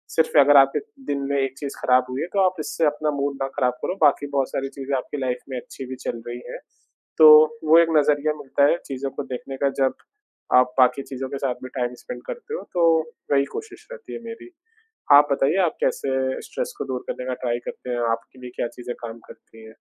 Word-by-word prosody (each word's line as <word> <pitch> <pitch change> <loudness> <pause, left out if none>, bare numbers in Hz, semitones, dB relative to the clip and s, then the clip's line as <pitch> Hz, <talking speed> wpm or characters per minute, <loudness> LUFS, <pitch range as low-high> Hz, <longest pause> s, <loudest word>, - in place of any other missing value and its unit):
सिर्फ़ 160 -1 +2
अगर 145 +1 +7
आपके 135 0 +5 0.3
दिन 140 - -1
में 140 - +1
एक 135 0 -3
चीज़ 140 0 -6
ख़राब 125 0 +3
हुई 130 +2 -3
है - - -2
तो 200 - +1
आप 185 0 +1
इससे 150 +2 -1
अपना 150 0 0
मूड 140 0 -1
ना 135 - 0
ख़राब 125 -3 +1
करो, 185 - -2
बाकी 145 -1 +4
बहुत 140 -2 -1
सारी 135 0 -3
चीज़ें 135 0 -4
आपकी 130 - -5
लाइफ़ 125 -1 -1
में 130 - -4
अच्छी 130 - -10
भी 130 +1 -6
चल 115 - -3
रही 120 0 -5
हैं, - - -7 0.6
तो 155 0 +8
वो 160 +2 +7
एक 170 -1 +4
नज़रिया 150 +1 +2
मिलता 140 -1 +1
है - - +1
चीज़ों 135 0 -4
को 145 - -5
देखने 135 +1 -7
का 140 - +4
जब 130 - +2 0.6
आप 125 0 +3
बाकी 130 +2 +4
चीज़ों 130 0 -4
के 140 - -4
साथ 130 - +1
भी 130 - -6
टाइम 125 0 -1
स्पेंड 250 - -7
करते 480 -2 -7
हो 480 - -3
तो, 165 -2 +4 0.3
वही 140 0 +3
कोशिश 445 0 -8
रहती 480 -2 -10
है - - -5
मेरी। 230 +9 -9 0.6
आप 145 +1 +8
बताइए 140 +5 +2
आप 160 - -2
कैसे 130 -1 -1
स्ट्रेस - - -4
को - - -4
दूर 130 -1 -4
करने 125 - -5
का 130 - -2
ट्राई 120 0 0
करते - - -7
हैं? 120 - -1
आपके 115 +3 -5
लिए 125 0 -8
क्या - - -1
चीज़ें 120 0 -8
काम 115 -1 -7
करती 110 0 -15
हैं? 110 - -13
140 Hz, 230 wpm, -23 LUFS, 130-155 Hz, 0.6 s, तो